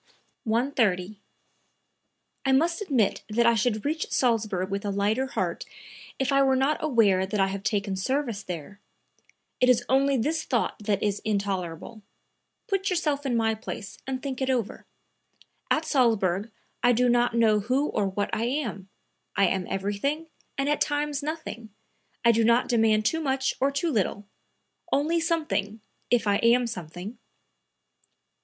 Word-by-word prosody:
130. 220 -5 0 1.2
"I 270 - +1
must 330 +7 +2
admit 260 - +1
that 235 +3 +2
I 235 - +6
should 220 0 0
reach 315 +2 -1
Salzburg 215 -6 0
with 200 +1 -2
a 205 - -2
lighter 205 +6 0
heart - - -2 0.5
if 270 +1 0
I 275 0 +4
were 265 -1 +4
not 270 +4 +1
aware 210 -10 +3
that 205 +2 -2
I 195 - +5
have 195 0 -4
taken 200 -2 -1
service 235 +1 -1
there; 180 +2 -7 0.8
it 250 - +4
is 245 -1 +4
only 275 +1 +3
this 315 +7 0
thought 240 -4 -1
that 205 -2 -1
is 205 -1 0
intolerable. 200 0 -3 0.6
Put 390 -3 -1
yourself 300 -6 0
in 240 -3 +1
my 225 -1 +2
place 215 -2 -7
and 260 -1 -3
think 270 -2 -4
it 265 - 0
over. 240 -6 -2 0.8
At 315 - +1
Salzburg 220 - +2 0.3
I 245 0 +4
do 250 +2 +3
not 240 -1 +2
know 220 -2 +4
who 255 +8 0
or 200 - 0
what 200 +1 -2
I 225 - 0
am; 235 -8 -3 0.5
I 200 - +4
am 190 -2 -2
everything 205 +11 -2 0.3
and 275 0 0
at 295 - +1
times 295 0 0
nothing. 285 -7 -5 0.6
I 235 - +8
do 230 0 +2
not 235 +2 +3
demand 220 -3 +3
too 320 +8 +1
much 265 -2 0
or 275 - +3
too 280 +4 -1
little; 205 -3 -1 0.7
only 315 +4 +2
something, 305 - -1 0.3
if 245 -2 +2
I 200 -1 +3
am 240 +3 +4
something." 185 +1 -7
235 Hz, 155 wpm, -26 LUFS, 205-275 Hz, 1.2 s, I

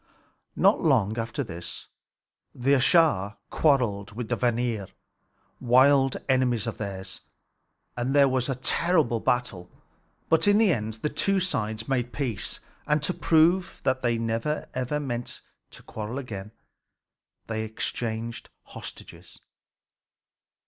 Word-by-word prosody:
Not - - +4
long 105 +4 +2
after 115 +6 -2
this, 85 -6 -7 0.7
the 130 +3 0
Æsir 130 - +3
quarreled 115 -10 +1
with 115 0 -5
the 120 - +1
Vanir, 120 -4 -1 0.7
wild 135 +2 +4
enemies 125 -4 +2
of 115 - -5
theirs, 95 -2 -6 0.7
and 125 +3 -1
there 140 -1 +6
was 130 0 0
a 135 - 0
terrible 145 -2 +1
battle. 110 -8 -1 0.6
But 160 +4 +3
in 205 0 +5
the 215 -5 +4
end 110 -3 -3
the 150 - +1
two 195 +4 +1
sides 110 - -2
made 125 -2 -1
peace; 125 -8 -3 0.3
and 150 -1 +1
to 180 - +1
prove 170 +3 +2
that 130 0 +1
they 120 -2 +1
meant 115 0 -1 0.3
never 130 -2 -2 0.4
to - - -12
quarrel 110 +4 -6
again, 105 -6 -6 0.9
they 110 0 -3
exchanged 110 +1 -4
hostages. - - -11
120 Hz, 120 wpm, -26 LUFS, 110-140 Hz, 0.9 s, there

